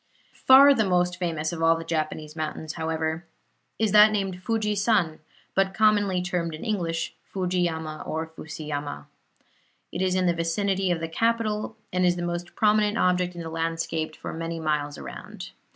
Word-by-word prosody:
Far 275 +2 +9
the 225 - +2
most 180 -2 +1
famous 165 -2 -2
of 165 - -5
all 165 0 +5
the 165 - -6
Japanese 155 -1 -3
mountains, 155 0 -4
however, 160 0 -2 0.5
is 220 -2 +1
that 210 +1 +8
named 195 -3 -2
Fuji 215 +1 0
san, 200 -6 +1 0.3
but 195 0 +1
commonly 205 -4 +3
termed 175 -3 -2
in 155 - -8
English 170 -7 -2
Fujiyama 175 -4 -2
or 160 +1 -2
Fusiyama. 150 - -6 0.9
It 175 - -4
is 185 -1 +1
in 185 -1 +2
the 175 - +3
vicinity 190 +3 0
of 170 -2 0
the 165 - -2
capital, 220 +3 -1 0.2
and 180 0 +1
is 175 -1 +3
the 175 - -4
most 175 0 -4
prominent 210 0 +3
object 180 -2 +1
in 170 - -6
the 165 - -6
landscape 165 -1 -2
for - - -7
many 165 0 -4
miles 150 -2 -1
around. - - -9
175 Hz, 170 wpm, -26 LUFS, 160-200 Hz, 0.9 s, Far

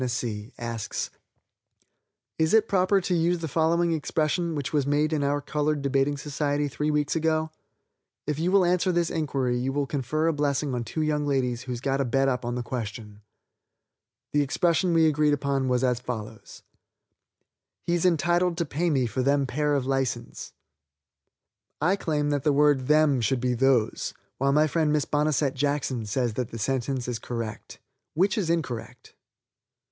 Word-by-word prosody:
_, 120 -3 -3
asks: 115 -2 -4 1.3
"Is 160 +6 +3
it 220 0 +4
proper 195 +1 +3
to 180 - -1
use 175 +1 +2
the 165 -1 -4
following 165 +3 +2
expression, 160 +2 -1
which 145 0 -4
was 145 -2 +1
made 150 +2 +1
in 150 -2 0
our 145 +1 0
colored 150 0 -1
debating 140 +1 +1
society 145 +1 -1
three 150 +2 -2
weeks 150 0 0
ago? 160 0 0 0.7
If 150 0 -2
you 175 +3 +1
will 195 -2 +5
answer 180 +1 +2
this 170 -1 0
inquiry 135 -5 -1
you 130 +2 -1
will 140 +1 0
confer 145 +3 -1
a 165 - +2
blessing 145 -1 0
on 120 -1 -2
two 155 +8 -3
young 150 -1 0
ladies 125 -4 0
who's 125 -2 -5
got 135 0 0
a - - 0
bet 135 +3 +1
up 125 -2 0
on 120 0 -3
the 125 - -3
question. 110 -4 -6 1.1
The 145 - +2
expression 170 +4 +1
we 160 -1 +5
agree 150 -1 +2
was 135 -3 0
as 125 -2 +1
follows: 110 -3 -7 1.2
'He's 175 -1 0
entitled 175 0 +2
to 170 - 0
pay 165 +4 -1
me 135 -5 +2
for 125 +3 -2
them 140 +1 +2
pair 145 +3 0
of 135 -2 -1
license.' 130 -3 -2 1.3
"I 180 +6 +2
claim 150 -6 -1
that 145 -1 0
the 150 - +2
word 145 -3 +3
'them' 150 -4 +4
should 130 +3 +1
be 125 0 0
'those,' 125 -2 +1 0.2
while 135 +1 +2
my 150 +2 +4
friend 155 0 +1
Miss 150 -1 +1
Bonesette 145 -2 +1
Jackson 135 -5 -1
says 120 +1 -1
that 125 +1 -3
the 115 - -7
sentence 130 +2 -2
is 120 -2 -3
correct. 115 -3 -6 0.4
Which 190 +5 +2
is 195 -7 -1
incorrect?" 145 -9 -3
145 Hz, 170 wpm, -26 LUFS, 125-155 Hz, 1.3 s, will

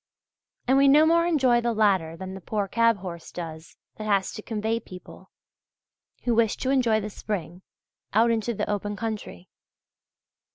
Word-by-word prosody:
And 265 +2 +4
we 275 - +5
no 295 +3 +6
more 335 +1 +3
enjoy 260 -8 +3
the 235 0 0
latter 190 -7 +2
than 190 +2 -7
the 190 - -8
poor 205 +2 -2
cab 230 +2 +3
horse 175 -3 -8
does, 160 -2 -8 0.2
that 215 - -6
has 195 -2 +1
to - - -8
convey 220 +1 -2
people, 185 -5 -13 0.9
who 240 - +1
wish 225 -2 +2
to 260 - -1
enjoy 240 -5 +3
the 210 0 -5
spring, 180 -4 -5 0.5
out 230 +3 +4
into 230 +1 -1
the - - -2
open 205 0 -2
country. 215 - -6
215 Hz, 165 wpm, -25 LUFS, 190-235 Hz, 0.9 s, no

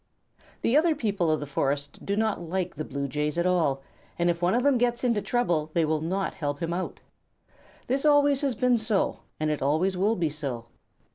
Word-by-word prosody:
The 235 - +2
other 315 +1 +4
people 205 - 0
of 155 - +2
the 145 - -4
forest 140 0 -2
do 200 - -1
not 220 0 0
like 180 +1 -2
the 155 - -5
Blue 140 -1 -4
Jays 150 +3 -2
at 170 - +1
all, 155 -7 +1 0.3
and 175 0 +3
if 170 0 -6
one 175 +4 +2
of 245 - +1
them 275 -3 +3
gets 240 0 0
into 235 -4 +2
trouble 175 -12 0
they 165 -2 +3
will 155 0 0
not 190 +4 -1
help 145 -2 -3
him 165 0 -2
out. 185 +1 -4 0.9
This 270 +2 0
always 290 -2 +4
has 275 -4 0
been 250 0 +2
so, 220 -3 0 0.2
and 155 0 0
it 150 - -2
always 160 +8 +1
will 205 +5 +2
be 165 -5 0
so. 135 -6 -5
175 Hz, 210 wpm, -27 LUFS, 150-235 Hz, 0.9 s, other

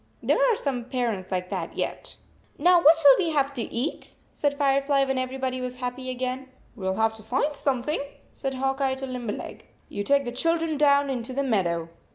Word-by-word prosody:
There - - +2
are - - +2
some 260 - -2
parents 230 -7 -2
like 180 -1 -2
that 180 -4 -4
yet. - - -4 0.2
" - - -33
Now, 350 +3 +5
what 320 +1 +7
shall 285 -4 +8
we 345 -4 +1
have 280 -1 +1
to 250 - -4
eat? 240 +6 -4
" - - -36
said 285 -1 0
Firefly, 275 0 +2
when 265 -1 -1
everybody 255 0 -3
was 250 0 -4
happy 255 +1 -5
again. 255 +1 -3 0.3
"We 190 - -5
ll 190 - 0
have 220 +1 +2
to 220 - -8
find 260 +7 -1
something," 275 +2 -1 0.3
said 270 -1 -4
Hawk 270 +1 -1
Eye 265 -1 +1
to 265 0 -5
Limberleg. 250 -5 -6 0.2
"You 205 - -3
take 280 +4 +2
the 240 - -3
children 330 +4 0
down 285 -1 +4
into 250 0 -4
the 280 +2 0
meadow. 175 -9 0
260 Hz, 205 wpm, -26 LUFS, 240-280 Hz, 0.3 s, shall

